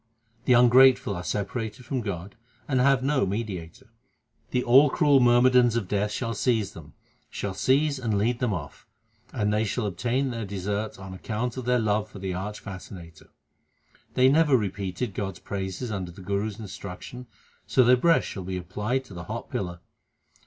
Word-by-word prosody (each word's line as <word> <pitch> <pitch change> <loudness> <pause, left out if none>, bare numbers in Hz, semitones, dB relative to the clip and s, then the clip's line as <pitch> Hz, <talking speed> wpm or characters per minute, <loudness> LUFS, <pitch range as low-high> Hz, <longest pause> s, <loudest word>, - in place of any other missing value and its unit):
The 125 - +5
ungrateful 125 -2 +6
are 90 - -5
separated 110 +4 -4
from 130 +1 -2
God 100 -3 -5 0.3
and 130 -3 +1
have 135 0 +3
no 140 0 +2
mediator. 95 -5 -5 0.6
The 125 - 0
all 135 +5 +6
cruel 145 0 +4
myrmidons 120 -1 +5
of 115 -5 -1
Death 105 +2 0
shall 115 +1 -2
seize 110 -2 0
them; 75 -2 -13 0.3
Shall 100 - -4
seize 140 +6 +2
and 110 -5 -1
lead 115 +4 +1
them 125 -3 0
off, 75 -8 -6 0.4
and 105 -3 0
they 105 +1 +2
shall 110 +2 -2
obtain 120 +8 -1
their 115 -1 -4
deserts 100 +2 -3
on 95 0 -9
account 115 +6 -3
of 130 -2 -5
their 125 0 +3
love 110 -2 0
for - - -11
the 95 -1 -4
arch 105 +4 -5
fascinator. 90 -5 -10 0.9
They 130 0 +5
never 145 -1 +5
repeated 100 +1 -3
God 95 -2 -3
s - - -13
praises 95 +4 -4
under 95 -4 -4
the 90 +2 -12
Guru 100 +2 -1
s 105 -2 -7
instruction, 105 +4 -8 0.4
so 130 - +4
their 125 +1 +6
breasts 165 +6 +3
shall 95 - -6
be 95 +1 -4
applied 105 +9 -2
to 100 - -13
the 85 -1 -7
hot - - -6
pillar. 90 -2 -4
105 Hz, 180 wpm, -26 LUFS, 95-125 Hz, 0.9 s, ungrateful